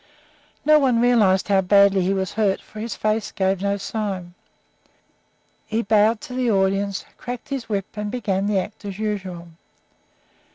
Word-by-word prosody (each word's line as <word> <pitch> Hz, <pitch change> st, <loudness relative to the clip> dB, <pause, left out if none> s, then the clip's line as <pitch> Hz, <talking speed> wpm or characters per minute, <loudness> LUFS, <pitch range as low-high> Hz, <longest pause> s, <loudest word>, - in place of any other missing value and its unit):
No 305 Hz, 0 st, +6 dB
one 255 Hz, -5 st, +2 dB
realized 220 Hz, -6 st, +3 dB
how 195 Hz, -2 st, +3 dB
badly 200 Hz, 0 st, +4 dB
he 185 Hz, +2 st, +1 dB
was 190 Hz, -1 st, -2 dB
hurt, 205 Hz, -3 st, +1 dB
for 215 Hz, -, -12 dB
his 225 Hz, +2 st, -4 dB
face 215 Hz, -1 st, -1 dB
gave 190 Hz, -1 st, 0 dB
no 200 Hz, 0 st, 0 dB
sign. 195 Hz, -4 st, -4 dB, 1.3 s
He 225 Hz, +2 st, -1 dB
bowed 215 Hz, +2 st, +3 dB
to 250 Hz, -, -8 dB
the 250 Hz, -1 st, 0 dB
audience, 195 Hz, 0 st, 0 dB
cracked 245 Hz, +2 st, -7 dB
his 270 Hz, -5 st, -4 dB
whip, 200 Hz, -3 st, -1 dB
and 210 Hz, -1 st, -3 dB
began 200 Hz, -4 st, -1 dB
the 210 Hz, -1 st, +1 dB
act 205 Hz, +4 st, -4 dB
as 200 Hz, -2 st, -6 dB
usual. 190 Hz, -5 st, -4 dB
205 Hz, 160 wpm, -22 LUFS, 195-220 Hz, 1.3 s, No